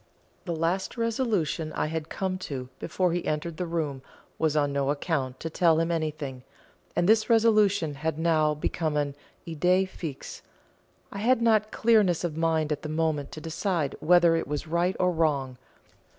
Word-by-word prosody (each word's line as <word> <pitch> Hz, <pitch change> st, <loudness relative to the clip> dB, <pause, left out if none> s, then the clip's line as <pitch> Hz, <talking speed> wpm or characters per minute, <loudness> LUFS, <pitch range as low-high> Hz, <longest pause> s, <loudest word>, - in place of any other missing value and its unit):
The 170 Hz, -3 st, -2 dB
last 170 Hz, +7 st, -1 dB
resolution 220 Hz, -, -1 dB
I -, -, -1 dB
had 160 Hz, 0 st, -4 dB
come 185 Hz, -1 st, -2 dB
to 130 Hz, -7 st, -6 dB
before 180 Hz, -2 st, 0 dB
he 175 Hz, -, -1 dB
entered 155 Hz, +2 st, -2 dB
the 180 Hz, -, -3 dB
room 155 Hz, -5 st, -2 dB, 0.4 s
was 155 Hz, -1 st, +1 dB
on 145 Hz, -1 st, +1 dB
no 140 Hz, -1 st, 0 dB
account 140 Hz, -3 st, -2 dB
to 165 Hz, -, -3 dB
tell 165 Hz, -1 st, +3 dB
him 165 Hz, +1 st, 0 dB
anything, 155 Hz, -5 st, -3 dB, 0.5 s
and 175 Hz, -, +2 dB
this 215 Hz, 0 st, +4 dB
resolution 210 Hz, -8 st, +3 dB
had 155 Hz, +2 st, -3 dB
now 155 Hz, -2 st, +2 dB
become 155 Hz, 0 st, -2 dB
an 145 Hz, -1 st, -1 dB, 0.3 s
idée 180 Hz, +4 st, +2 dB
fixe. 160 Hz, -7 st, -7 dB, 0.7 s
I 200 Hz, -, -6 dB
had 240 Hz, +3 st, +3 dB
not 220 Hz, -2 st, +2 dB
clearness 210 Hz, -8 st, +3 dB
of 170 Hz, -3 st, -2 dB
mind 160 Hz, -1 st, +1 dB
at 150 Hz, -, -2 dB
the 150 Hz, -, -6 dB
moment 155 Hz, -2 st, -1 dB
to 155 Hz, -, -7 dB
decide 165 Hz, -2 st, -2 dB
whether 175 Hz, 0 st, +5 dB
it 165 Hz, -, -2 dB
was 145 Hz, +1 st, -3 dB
right 170 Hz, +3 st, 0 dB
or 180 Hz, 0 st, +3 dB
wrong. 140 Hz, -6 st, 0 dB
165 Hz, 170 wpm, -27 LUFS, 150-185 Hz, 0.7 s, whether